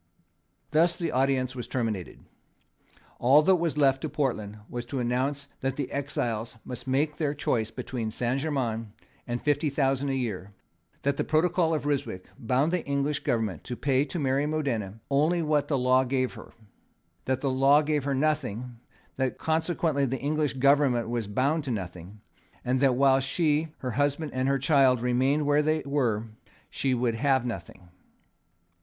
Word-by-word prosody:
Thus 165 +3 +3
the 170 -3 -2
audience 130 0 +1
terminated. 110 -8 -3 1.0
All 135 +5 +6
that 190 +3 +4
was 165 -3 -1
left 135 -2 +3
to 155 - -3
Portland 120 -8 -2
was 120 -1 -5
to 135 +3 -5
announce 130 +4 -1
that 135 0 -2
the 140 -2 -4
exiles 120 -6 -3
must 125 0 -7
make 145 +3 +1
their 150 -2 -1
choice 115 -6 0
between 120 -1 -4
Saint 120 +4 -1
Germains 120 -7 -2 0.4
and 120 0 -2
fifty 145 +1 +1
thousand 135 0 0
a 135 - 0
year; 105 -6 -4 0.5
that 140 0 +1
the - - +1
protocol 165 +1 +2
of 150 - -3
Ryswick 140 -10 -2
bound 130 +5 +1
the 180 - 0
English 140 +1 0
government 110 -8 -1
to 125 - -4
pay 135 +1 +1
to 150 - -5
Mary 140 -1 +1
of - - -2
Modena 115 -10 -2
only 160 +5 +2
what 150 -2 +1
the 145 - +1
law 130 +1 +3
gave 130 0 -1
her; - - -12 0.7
that 130 0 -1
the 135 - 0
law 135 +3 +5
gave 150 -1 0
her 140 -1 0
nothing; 125 -5 -1 0.4
that 130 -1 -1
consequently 160 -3 0
the 135 +2 -2
English 150 +2 0
government 135 -3 +3
was 120 -3 -2
bound 140 +9 0
to - - -4
nothing; 95 -2 -6 0.4
and 125 +1 +1
that, 135 -2 +3
while 135 0 +4
she, 150 +3 +1
her 125 - -4
husband 145 +4 0
and 130 +1 0
her 140 0 +2
child 135 -3 +4
remained 130 +5 +1
where 145 +1 +3
they 155 +1 0
were, 120 -7 0 0.5
she 135 -2 0
should 120 -1 0
have 130 +1 +1
nothing. 95 -6 -7
135 Hz, 170 wpm, -27 LUFS, 125-145 Hz, 1.0 s, All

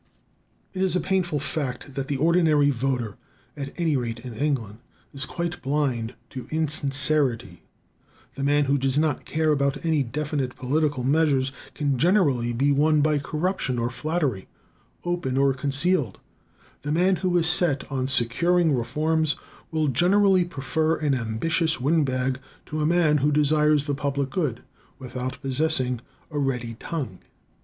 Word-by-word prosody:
It 190 - -3
is 190 -1 +1
a - - +3
painful 180 -5 0
fact 140 -2 -4
that 135 0 -4
the 140 - -1
ordinary 155 -2 +3
voter, 125 -5 -2 0.4
at 140 -1 -5
any 165 -3 +1
rate 115 -3 -3
in 125 -1 -8
England, 115 -4 -2 0.3
is 140 +1 -2
quite 175 0 -4
blind 130 -5 -1 0.2
to 130 - -7
insincerity. 140 - 0 0.7
The - - -7
man 145 +1 +3
who 140 +1 +1
does 135 +1 0
not 150 -2 0
care 155 0 +1
about 140 +1 0
any 160 -3 +2
definite 140 0 -3
political 145 0 0
measures 140 -1 +2 0.2
can 140 -4 0
generally 145 - +3
be 135 +5 +1
won 150 +2 +3
by 150 0 +2
corruption 150 -3 -2
or 120 +1 -1
flattery, 150 - -2 0.6
open 175 -7 -2
or 135 0 +3
concealed; 140 - 0 0.6
the 145 - -4
man 180 +4 +3
who 180 +1 +1
is 165 - +2
set 170 -4 +3
on 130 -1 -1
securing 160 +7 +2
reforms 150 +6 0 0.3
will 155 -1 0
generally 185 - +4
prefer 160 +1 -1
an 150 -3 0
ambitious 135 +7 0
windbag 130 -3 +1 0.3
to 155 0 -4
a 150 - +2
man 160 -3 +3
who 145 +2 +2
desires 150 0 +3
the 145 - -1
public 140 -1 -2
good 145 - -2 0.3
without 125 0 -5
possessing 130 -3 0 0.3
a 150 - -2
ready 125 -4 -2
tongue. 130 - -5
145 Hz, 150 wpm, -25 LUFS, 130-160 Hz, 0.7 s, generally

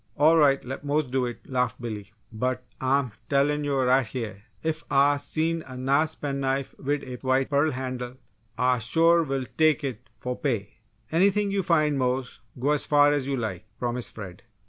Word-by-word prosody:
"All 155 +3 +6
right 140 -5 +4
let 135 +3 -6
Mose 145 +1 +1
do 125 0 0
it!" 120 - -8
laughed 125 -1 -1
Billy. 110 -4 -6 0.2
"But 125 +3 -2 0.2
Ah'm 130 -1 +1 0.2
tellin' 145 +1 +2
yo' 140 -2 +1
right 130 +1 +4
heah 110 -4 -5 0.2
ef 160 0 -2
Ah 140 +1 +4
see 165 +3 -1
a 130 -1 -9
nice 140 +5 +2
pen 140 -1 -3
knife 135 0 -1
wid 145 +1 -1
a 125 -1 -6
white 130 +2 0
pearl 145 +2 +3
han'le 130 -2 -4 0.4
Ah 125 0 +2
sure 165 +9 +4
will 135 -4 -2
tek 155 -1 +4
it 125 -6 -5
fo' 125 - -3
pay!" 115 -7 -3 0.3
"Anything 200 +4 +3
you 200 0 +1
find, 155 -5 +2
Mose! 125 0 -1 0.2
Go 135 +4 +1
as 150 - +1
far 145 0 +5
as 140 -2 -1
you 140 -1 -1
like!" 105 -4 -4
promised 120 0 -3
Fred. 95 -2 -8
135 Hz, 185 wpm, -26 LUFS, 125-150 Hz, 0.4 s, All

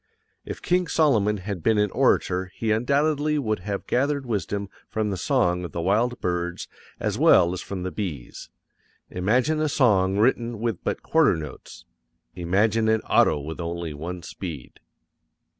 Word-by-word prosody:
If - - -7
King 180 0 +1
Solomon 110 -12 +2
had 95 -1 -5
been 110 +6 +2
an 105 -1 +2
orator 90 +1 +1
he 110 -1 -1
undoubtedly 145 +6 +1
would 110 -8 -1
have 100 +2 -4
gathered 140 +2 0
wisdom 100 -3 -2 0.2
from 110 -1 -1
the - - -2
song 90 -4 +1
of 85 - -7
the - - -3
wild 110 +8 +1
birds 90 -1 -2 0.3
as - - -2
well 85 +1 +5
as 90 - -4
from 95 -2 -6
the 95 - -3
bees. 80 - -6 0.6
Imagine 125 +12 +1
a 155 - +1
song 100 -9 +3
written 115 0 +1
with 115 -5 -2
but - - -3
quarter - - +3
notes. 75 -4 -9 0.5
Imagine 105 +6 +1
an 110 0 +2
auto - - +3
with 80 +4 -7
only 85 -1 -4
one 85 +4 -6
speed. 80 -6 -8
105 Hz, 160 wpm, -24 LUFS, 90-120 Hz, 0.6 s, well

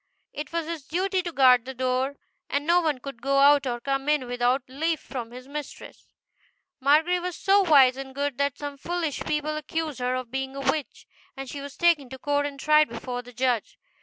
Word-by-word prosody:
It 295 - -6
was 335 -1 -2
his 330 -1 -5
duty 375 +3 0
to 350 -1 -5
guard 255 -5 +5
the 265 0 -7
door, 255 +2 0 0.3
and 285 +1 -1
no 345 +2 +4
one 310 -5 0
could 260 -2 -9
go 275 +2 +1
out 280 0 +5
or 240 -1 -2
come 275 +3 -2
in 300 -3 +2
without 245 +2 +1
leave 315 +5 -1
from 240 -4 -6
his 250 +2 -11
mistress. 290 0 -8 0.7
GO. - - -20
Margery 320 +5 +4
was 360 -1 -4
so 395 +4 +4
wise 275 -8 +5
and 265 -1 -8
good 280 -1 -2
that 280 0 0
some 285 -1 -6
foolish 335 -2 -2
people 305 0 -1
accused 305 -2 -4
her 250 0 0
of 255 -2 -5
being 265 0 -3
a 275 - -5
witch, 290 +1 -2 0.3
and 270 0 -6
she 280 +2 -6
was 280 0 -9
taken 335 -7 +3
to 265 - -8
court 290 +1 0
and 280 -1 -9
tried 305 +1 +4
before 245 +2 -5
the 245 0 -13
judge. 250 -2 -1
280 Hz, 215 wpm, -26 LUFS, 255-305 Hz, 0.7 s, guard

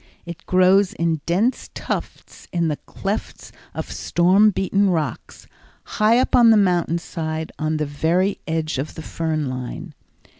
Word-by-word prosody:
It 170 -1 -9
grows 185 +2 +4
in 165 -6 -1
dense 205 +9 0
tufts - - -6
in 170 -2 0
the 150 - -2
clefts 200 +2 -5 0.2
of - - -5
storm 185 +5 +3
beaten 195 0 +1
rocks, 160 -6 -3 0.4
high 215 +2 +2
up 255 - +2
on 240 -2 +7
the 220 - +6
mountain 175 -4 +2
side 160 -1 -5
on 155 0 -1
the 150 - -1
very 165 +7 0
edge 160 -3 -2
of 145 +3 -5
the 160 - -7
fern 155 -3 -2
line. 130 +6 -6
170 Hz, 150 wpm, -21 LUFS, 155-195 Hz, 0.4 s, on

